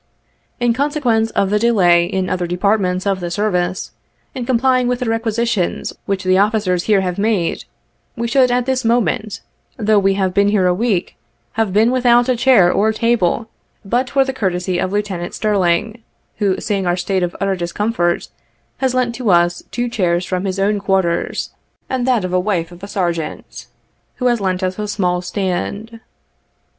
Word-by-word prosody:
In 240 -1 +2
conse 290 +4 -1
quence 225 -5 +1
of 195 0 +1
the 210 - +2
delay 180 -7 +4
in 185 +1 -2
other 180 -1 -2
departments 185 0 0
of 195 -1 0
the 175 -1 -4
service, 180 -1 -1 0.4
in 250 -3 -5
complying 255 0 +2
with 250 0 0
the - - 0
requisitions 225 -3 -1
which 195 -1 -1
the 185 0 +3
officers 200 -4 +1
here 205 -3 +3
have 180 0 -3
made, 205 -5 0 0.5
we 235 -1 -2
should 255 +1 +3
at 245 0 +1
this 260 0 0
moment, 225 -2 0 0.4
though 215 -2 +3
we 195 0 +2
have 190 -2 0
been 200 +1 +3
here 205 -3 +2
a 180 - +3
week, 200 -2 -1 0.3
have 225 -3 -1
been 220 +5 +3
without 245 -1 +3
a 255 - +2
chair 230 -8 +5
or 215 +2 +2
table 230 -2 0 0.4
but 245 +5 0
for 270 -1 +2
the 265 - -3
courtesy 180 -5 -1
of 185 - -1
Lieutenant 200 -4 -3
Stirling, 210 +2 0 0.4
who, 200 -3 0
seeing 195 -3 -2
our 175 0 +1
state 190 +1 -1
of 175 -1 -2
utter 195 -1 0
discomfort, 175 0 -1 0.5
has 260 -1 0
lent 250 -2 +1
to 235 -2 -2
us 175 -1 +3
two 245 0 -2
chairs 180 -7 0
from 185 +1 -2
his 190 0 -2
own 205 +1 +1
quarters; 190 -3 -1 0.4
and 255 -1 -2
that 240 -7 +2
of 180 - -4
the 185 - +2
wife 180 -3 -1
of 175 0 -13
a 200 - -7
Sergeant, 175 -6 -4 0.5
who 250 - -4
has 240 -3 +2
lent 185 -1 -1
us 185 +2 -2
a 210 - -2
small 180 -4 0
stand. 200 +4 -3
205 Hz, 180 wpm, -18 LUFS, 180-235 Hz, 0.5 s, chair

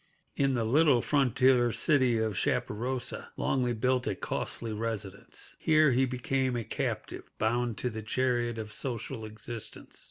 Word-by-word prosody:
In 135 -1 +2
the 115 -2 0
little 140 0 +4
frontier 130 -3 +3
city 130 -4 +3
of 110 -1 0
Chaparosa, 125 +7 -2
Longley 125 -2 +1
built 125 +2 +1
a - - 0
costly 115 -2 -3
residence. 105 -3 -5
Here 155 -2 +4
he 130 +2 +3
became 130 +1 0
a 120 - -1
captive, - - -4
bound 120 +1 0
to 125 - -1
the 110 0 -5
chariot 120 0 0
of 110 -1 -5
social 115 -3 -4
existence. 110 +1 -8
120 Hz, 145 wpm, -30 LUFS, 110-130 Hz, -, little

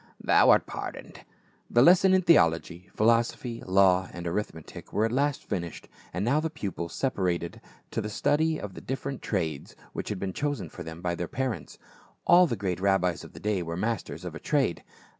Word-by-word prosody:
— - - -43
Thou - - +6
art - - +6
pardoned." - - -7 0.5
The 120 - +5
lessons 185 +3 +6
in 185 - +2
theology, 85 - +3
philosophy, 115 +1 +1
law 95 -1 +4
and 85 0 -7
arith 95 +5 -1
metic 80 -1 -11
were 110 - +2
at 115 - -1
last 140 +3 0
finished; 85 -5 -4 0.2
and 90 +4 -2
now 140 +6 +3
the 160 +1 -1
pupils 100 - -5
sepa 135 -5 -1
rated 85 -2 -1 0.3
to - - -1
the 105 - -4
study 155 +8 +1
of 100 -2 -7
the - - -9
different 135 0 -4
trades 80 -8 -3 0.2
which - - -4
had 105 - -2
been 95 0 -4
chosen 145 - -2
for 90 - -10
them 80 +1 -8
by 90 -1 0
their 85 0 -3
parents. 130 0 -4 0.5
All 175 +1 +7
the 120 - -1
great 95 -4 -2
rabbis 95 -2 +1
of - - -12
the - - -10
day 105 -3 0
were 85 0 -4
masters 110 +1 -3
of - - -5
a - - -7
trade. - - 0
100 Hz, 200 wpm, -27 LUFS, 90-130 Hz, 0.5 s, All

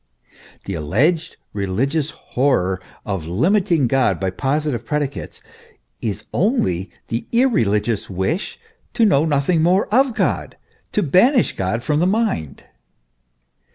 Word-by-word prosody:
The 100 - -4
alleged 150 - 0 0.2
religious 130 - -1
horror 95 -13 0 0.2
of 95 -6 -3
limiting 170 - +2
God 130 +1 +2
by 95 -1 -1
positive 135 +2 -1
predicates, 145 -2 -4 0.6
is 105 -3 -3
only 100 - +1 0.2
the 115 +1 -3
irreligious 115 - +1
wish 95 - -2 0.4
to 230 - +4
know 160 -7 +4
nothing 155 +2 +1
more 180 +5 +3
of 260 -1 +3
God, 205 - -1 0.4
to 210 - +1
banish 225 - +3
God 100 +5 -2
from 150 +4 +1
the 175 - +3
mind. 195 - -1
140 Hz, 120 wpm, -20 LUFS, -, 0.6 s, to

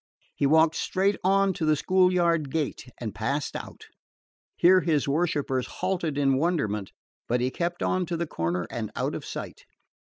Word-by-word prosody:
He 140 - +1
walked 160 +2 +5
straight 195 +2 +1
on 195 +1 +3
to 165 - -5
the 155 -1 +3
schoolyard 175 -3 +2
gate 150 -3 -3
and 110 -5 -4
passed 135 +7 -2
out. - - -8 0.7
Here 185 +1 +5
his 155 -5 +1
worshipers 140 -4 0
halted 175 -5 -2
in 135 -2 +3
wonderment, 140 - -1 0.4
but 120 +1 +1
he 125 +1 0
kept 175 +3 -2
on 185 -2 0
to 170 - -2
the 170 - -1
corner 85 - -2
and 110 -3 -4
out - - -1
of - - -5
sight. - - -7
155 Hz, 170 wpm, -26 LUFS, 135-175 Hz, 0.7 s, walked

